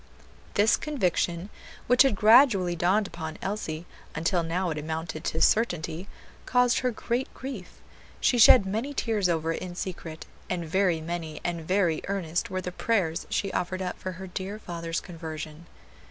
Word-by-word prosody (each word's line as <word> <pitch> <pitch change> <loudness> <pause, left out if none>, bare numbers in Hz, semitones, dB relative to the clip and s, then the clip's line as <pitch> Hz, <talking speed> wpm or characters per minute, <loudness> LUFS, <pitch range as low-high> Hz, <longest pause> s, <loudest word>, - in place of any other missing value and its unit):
This 210 +3 +4
conviction, 185 - -1 0.3
which 250 +1 +5
had 270 -6 +5
gradually 210 -5 +5
dawned 185 +5 +2
upon 160 -4 -6
Elsie, 175 -5 -4 0.3
until 165 +3 +1
now 170 +2 -1
it 155 - -3
amounted 160 +1 -4
to 160 - -1
certainty, 175 -5 +1 0.4
caused 250 -1 +3
her 255 - +1
great 245 +2 -2
grief; 260 -9 -8 0.4
she 245 - +2
shed 220 -1 +8
many 225 +9 -3
tears 210 -7 +1
over 165 -1 0
it - - -5
in 180 -1 -6
secret, 170 -3 -6 0.2
and 175 -2 -2
very 180 -1 +1
many 165 -1 -5
and 175 -1 -2
very 185 -4 +2
earnest 190 +1 -2
were 185 -1 -2
the 180 - -4
prayers 180 -5 0
she 195 -1 -1
offered 185 +1 -2
up 180 - -3
for 185 - -4
her 185 +2 -8
dear 190 +3 -5
father's 170 -4 -4
conversion. 160 -1 -8
180 Hz, 160 wpm, -27 LUFS, 165-210 Hz, 0.4 s, shed